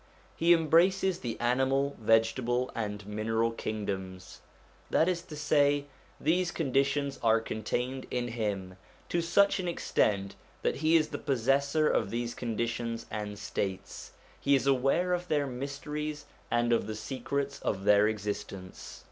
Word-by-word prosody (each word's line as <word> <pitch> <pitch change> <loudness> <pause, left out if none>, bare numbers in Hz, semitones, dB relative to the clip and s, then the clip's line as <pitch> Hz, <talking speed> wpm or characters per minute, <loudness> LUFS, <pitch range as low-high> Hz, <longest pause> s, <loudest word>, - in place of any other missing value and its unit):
He 170 +1 +3
embraces 175 +3 +4
the 120 -2 -4
animal, 135 +3 +1
vegetable, 115 +3 +2
and 105 -2 -4
mineral 110 +2 0
kingdoms: 95 -5 -5 0.5
that 160 - +3
is 180 -2 0
to 155 - -10
say, 145 -1 +2 0.3
these 175 +3 +2
conditions 140 -2 0
are 115 0 +4
contained 125 +4 -3
in 120 -1 -2
him 100 -5 -3 0.3
to 170 - +1
such 200 +4 +3
an 180 - -2
extent 100 - 0 0.3
that - - +1
he 155 +3 +3
is 155 -2 +3
the - - -5
possessor 140 +3 +2
of - - +1
these 120 +2 -2
conditions 115 0 -3
and 105 -1 -4
states; 100 -2 -4 0.3
he 140 0 +3
is 135 - +1
aware 140 +7 +2
of 180 0 -2
their 145 -3 +1
mysteries 145 +3 -5 0.2
and 120 0 +2
of 115 - +1
the 110 - -4
secrets 135 +5 -3
of 95 -2 -2
their 105 +1 +5
existence. 100 -3 -5
125 Hz, 140 wpm, -30 LUFS, 110-150 Hz, 0.5 s, their